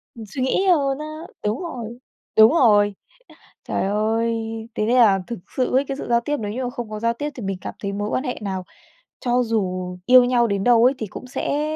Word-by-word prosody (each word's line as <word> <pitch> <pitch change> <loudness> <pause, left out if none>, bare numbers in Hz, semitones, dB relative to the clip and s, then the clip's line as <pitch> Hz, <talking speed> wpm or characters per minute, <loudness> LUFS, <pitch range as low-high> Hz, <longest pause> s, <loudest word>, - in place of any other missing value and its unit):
Ừm, 225 - -8
suy 255 +6 -5
nghĩ 320 +9 +1
hơn 280 -6 +2
á, 305 - -5 0.4
đúng 210 - -1
rồi, 240 -8 -6 0.4
đúng 220 +2 +8
rồi. 210 -9 +4 0.7
Trời - - -2
ơi, 220 +3 0 0.4
thế 215 - 0
nên 240 +3 +2
là 210 -6 +5
thực 235 -4 -5 0.2
sự 255 - 0
ấy 275 +2 +3
cái 270 0 -4
sự - - -6
giao 235 0 +3
tiếp 295 +4 -2
nếu 210 -2 -4
như 255 +4 -3
mà 245 - -2
không 240 -3 -6
có 215 0 -5
giao 230 +1 +1
tiếp 290 +5 -4
thì 240 - -7
mình 195 -1 -3
cảm - - -6
thấy 200 -1 -3
mối 205 +1 -3
quan 260 - -1
hệ 250 - -3
nào 190 -3 -3 0.6
cho 245 0 +1
dù 185 -5 -2
yêu 255 +2 +8
nhau 245 -1 +2
đến 200 -2 -1
đâu 235 0 +5
ấy 260 - +5
thì 220 - -4
cũng 255 - -9
sẽ 280 +3 -2
235 Hz, 235 wpm, -22 LUFS, 210-255 Hz, 0.7 s, đúng